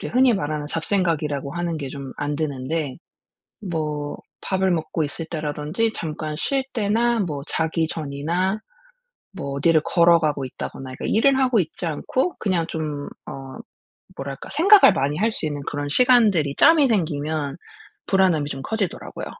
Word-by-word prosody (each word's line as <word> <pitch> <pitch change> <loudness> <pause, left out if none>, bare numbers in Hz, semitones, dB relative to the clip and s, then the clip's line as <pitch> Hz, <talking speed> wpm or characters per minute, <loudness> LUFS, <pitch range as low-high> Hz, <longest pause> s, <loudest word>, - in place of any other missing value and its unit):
우리 - - -4
흔히 250 -2 +4
말하는 150 -5 -2
잡생각이라고 160 -4 -1
하는 170 -1 -2
게 140 -3 -5
좀 135 -1 -7
안 145 0 -2
드는데 145 -1 -2 0.6
뭐 150 -6 -3 0.2
밥을 190 -1 0
먹고 160 -1 -1
있을 160 +3 -4
때라든지 155 +8 -2
잠깐 155 -1 -4
쉴 270 - 0
때나 230 +2 +1
뭐 150 -7 -2
자기 160 0 0
전이나 165 +7 -2 0.7
뭐 140 -8 -5
어디를 160 +1 +4
걸어가고 165 -5 +3
있다거나 130 +1 -7
이렇게 130 - -6
일을 265 +5 +4
하고 255 -4 +3
있지 170 +1 -3
않고 260 - -1
그냥 180 -5 0
좀 150 -3 -4 0.2
어 135 -1 -8 0.6
뭐랄까 135 0 -6
생각을 395 +5 +7
많이 140 +2 0
할 220 +3 +2
수 155 - +1
있는 145 -2 -3
그런 145 0 -3
시간들이 205 - +4
짬이 315 -4 +6
생기면 155 - -1 0.5
불안함이 180 -7 +2
좀 135 -1 -5
커지더라고요. 205 +1 -3
160 Hz, 320 characters per minute, -23 LUFS, 145-195 Hz, 0.7 s, 생각을